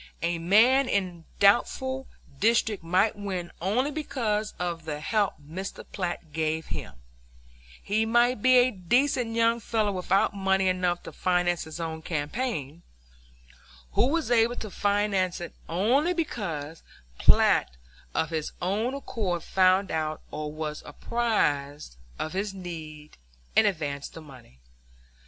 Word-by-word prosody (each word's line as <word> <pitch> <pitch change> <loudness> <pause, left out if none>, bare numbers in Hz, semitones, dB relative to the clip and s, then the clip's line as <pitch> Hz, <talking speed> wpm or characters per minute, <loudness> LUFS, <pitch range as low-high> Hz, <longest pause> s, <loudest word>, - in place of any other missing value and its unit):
A 170 0 0
man 235 +10 +5
in 180 -4 -1
a - - -29
doubtful 260 +6 +2 0.3
district 220 -3 +2
might 185 +6 +2
win 190 -4 -4
only 240 - +1
because 235 -8 -2
of 170 -2 -3
the 150 -2 -4
help 205 +5 0
Mr. 165 +7 -7
Platt 175 -4 -4
gave 160 0 -1
him; - - -6 0.9
he 215 +2 +1
might 240 +1 +3
be 255 +2 +6
a 250 +1 +5
decent 235 +4 +1
young 230 0 +3
fellow 220 -2 0
without 190 +1 +1
money 190 -1 +1
enough 180 -1 0
to - - -8
finance 180 -2 0
his 160 +2 -8
own 160 -1 -4
campaign, 160 - -3 1.1
who - - +3
was 315 -2 0
able 235 0 +4
to 215 -4 -6
finance 200 -3 +1
it 175 - -7 0.2
only 250 - +2
because 165 - -4 0.4
Platt - - +5 0.5
of 160 - 0
his 160 -2 -3
own 215 +8 -1
accord 200 - -3
found 185 +1 +3
out 155 -1 -2
or 150 0 -4
was 155 0 -5
apprised 145 - -1 0.2
of 155 - -4
his 195 +1 -2
need 155 -5 -8 0.4
and - - +6
advanced 145 -7 -3
the 165 - -8
money. 125 - -15
190 Hz, 135 wpm, -27 LUFS, 160-225 Hz, 1.1 s, be